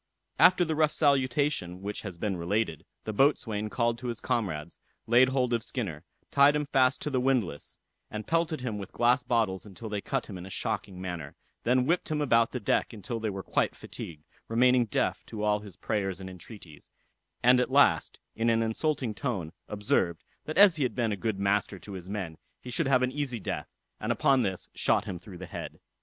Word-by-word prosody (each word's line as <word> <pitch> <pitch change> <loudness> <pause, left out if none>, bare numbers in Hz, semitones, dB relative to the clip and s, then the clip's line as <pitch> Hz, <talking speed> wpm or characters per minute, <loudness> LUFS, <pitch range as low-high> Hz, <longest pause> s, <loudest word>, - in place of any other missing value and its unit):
After 180 -1 +6
the 160 - -1
rough 155 -1 +3
salutation 135 - +1
which 105 +1 -4
has 95 -5 -7
been 100 +2 -1
related, 85 -1 -1 0.2
the 110 - -4
boatswain 110 -4 +2
called 115 +1 0
to 125 - -5
his 120 -1 -3
comrades, 85 -8 -2 0.3
laid 120 +3 +5
hold 130 -2 +1
of 115 - +1
Skinner, 100 - -4 0.3
tied 140 +1 +6
him 150 0 0
fast 135 -2 +2
to 150 - -2
the 130 - +1
windlass, 125 - -1 0.3
and 105 0 -5
pelted 165 -3 0
him 110 -5 -3
with 100 - -7
glass 120 +2 +3
bottles 110 -6 0
until 105 +2 -9
they 105 -1 -2
cut 135 +3 -2
him 95 -4 -8
in 90 - -8
a - - -9
shocking 95 0 -3
manner, 85 -6 -5 0.3
then 125 +1 +3
whipped 170 +5 +1
him 155 -1 0
about 115 -5 +3
the 125 - -3
deck 105 - 0
until 115 +2 -5
they 110 -1 -1
were 95 -1 -5
quite - - 0
fatigued, 75 -2 -9 0.2
remaining 125 +1 +4
deaf 105 - -1
to 105 -2 -5
all 105 0 +2
his 100 -4 -11
prayers 95 -3 -2
and 95 -1 -7
entreaties; 90 -3 -12 0.5
and 125 +1 +6
at 125 - +1
last, 130 - +4 0.2
in 115 +1 +1
an 115 0 +3
insulting 125 +1 -1
tone, 100 - -3
observed, 95 -5 0 0.2
that 155 - -4
as 195 -4 +7
he - - -3
had 125 -4 -1
been 115 -3 +1
a - - 0
good 105 0 -2
master 100 0 +1
to 100 - -11
his 95 -1 -8
men, 95 -6 -4 0.2
he 125 - -9
should 155 +4 +1
have 130 -2 +4
an 125 - +1
easy 135 -4 -3
death, - - -4 0.3
and - - -1
upon 135 -2 +3
this 95 -5 -2
shot - - +2
him 90 - -5
through 95 0 -11
the 95 - -7
head. - - -7
115 Hz, 205 wpm, -29 LUFS, 95-130 Hz, 0.5 s, as